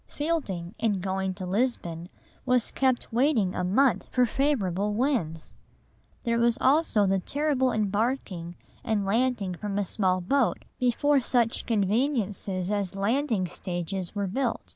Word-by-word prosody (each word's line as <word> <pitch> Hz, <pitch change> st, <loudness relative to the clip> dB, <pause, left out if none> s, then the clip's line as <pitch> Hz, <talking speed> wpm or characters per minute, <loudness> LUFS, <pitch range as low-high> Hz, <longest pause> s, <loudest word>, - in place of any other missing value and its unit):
Fielding, 215 Hz, -, -3 dB
in 225 Hz, -2 st, +2 dB
going 190 Hz, 0 st, -1 dB
to 185 Hz, -1 st, -6 dB
Lisbon, 180 Hz, -5 st, -1 dB, 0.3 s
was 250 Hz, -3 st, +1 dB
kept 260 Hz, -4 st, 0 dB
waiting 235 Hz, -7 st, +2 dB
a -, -, -2 dB
month 235 Hz, +9 st, +2 dB
for 250 Hz, -1 st, +3 dB
favourable 210 Hz, -7 st, 0 dB
winds! 215 Hz, -, -1 dB, 0.6 s
There 235 Hz, -2 st, +1 dB
was 235 Hz, 0 st, +3 dB
also 265 Hz, -7 st, +3 dB
the 195 Hz, 0 st, +2 dB
terrible 275 Hz, +3 st, 0 dB
embarking 205 Hz, -5 st, -1 dB, 0.3 s
and 210 Hz, -3 st, 0 dB
landing 220 Hz, -2 st, 0 dB
from 200 Hz, +2 st, -4 dB
a 205 Hz, -, 0 dB
small 185 Hz, -1 st, +1 dB
boat 250 Hz, +8 st, 0 dB
before 275 Hz, +4 st, +3 dB
such 240 Hz, -2 st, 0 dB
conveniences 205 Hz, -4 st, 0 dB
as 200 Hz, -2 st, -1 dB
landing 220 Hz, 0 st, 0 dB
stages 180 Hz, +1 st, -4 dB
were 200 Hz, -1 st, -1 dB
built. 235 Hz, +5 st, -1 dB
210 Hz, 135 wpm, -27 LUFS, 190-255 Hz, 0.6 s, for